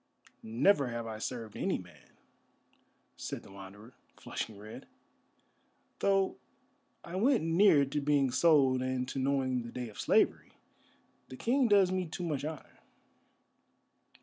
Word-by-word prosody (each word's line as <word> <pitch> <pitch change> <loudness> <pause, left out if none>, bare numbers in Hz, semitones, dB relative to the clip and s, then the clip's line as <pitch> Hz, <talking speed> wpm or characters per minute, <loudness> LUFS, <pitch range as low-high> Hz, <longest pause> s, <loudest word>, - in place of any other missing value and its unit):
"Never 135 - +2
have 120 -1 -4
I 110 -1 -6
served 115 -2 -5
any - - -1
man," - - -15 1.0
said - - -6
the - - -15
Wanderer, 100 +4 -12 0.3
flushing 110 -3 -6
red, 105 +2 -11 1.1
"though 195 -1 +1 0.7
I 170 - -8
went 245 - +3
near 165 -3 +4
to 145 +2 -3
being 140 -2 +2
sold 135 -2 +4
and 130 0 -2
to 135 - -4
knowing 130 -2 0
the 115 0 -8
day 125 -2 -5
of 105 - -13
slavery. - - +1 0.8
The 130 - -9
King 255 - +2
does 200 -4 +4
me 185 -1 -1
too 160 +3 -6
much 150 -5 -2
honour." 155 -1 -8
135 Hz, 135 wpm, -31 LUFS, 120-170 Hz, 1.1 s, near